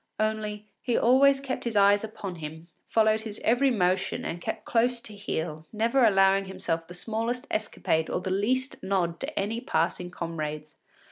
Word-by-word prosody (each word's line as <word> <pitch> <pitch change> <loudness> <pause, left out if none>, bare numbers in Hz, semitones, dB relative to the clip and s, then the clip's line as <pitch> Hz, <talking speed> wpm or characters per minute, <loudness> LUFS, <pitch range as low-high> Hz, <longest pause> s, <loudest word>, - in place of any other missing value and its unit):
Only, 215 -1 -1 0.2
he 245 -2 0
always 270 +3 +5
kept 270 -1 -4
his 235 -2 -3
eyes 200 0 +5
upon 200 -4 -6
him, 160 +2 -8 0.2
followed 220 -1 +3
his 220 -1 -6
every 245 +4 +4
motion 185 -5 0
and 170 +1 -4
kept - - -4
close 240 +1 +2
to 215 - -8
heel, 160 -6 -4
never 230 +4 +2
allowing 195 -2 +5
himself 170 -3 -3
the 175 - -9
smallest 230 +5 -2
escapade 160 -6 0
or - - -1
the 185 +1 -4
least 255 +8 0
nod 185 -3 0
to 290 +3 -3
any 220 +4 -2
passing 175 +1 0
comrades. 155 -3 -5
205 Hz, 165 wpm, -27 LUFS, 175-230 Hz, 0.2 s, always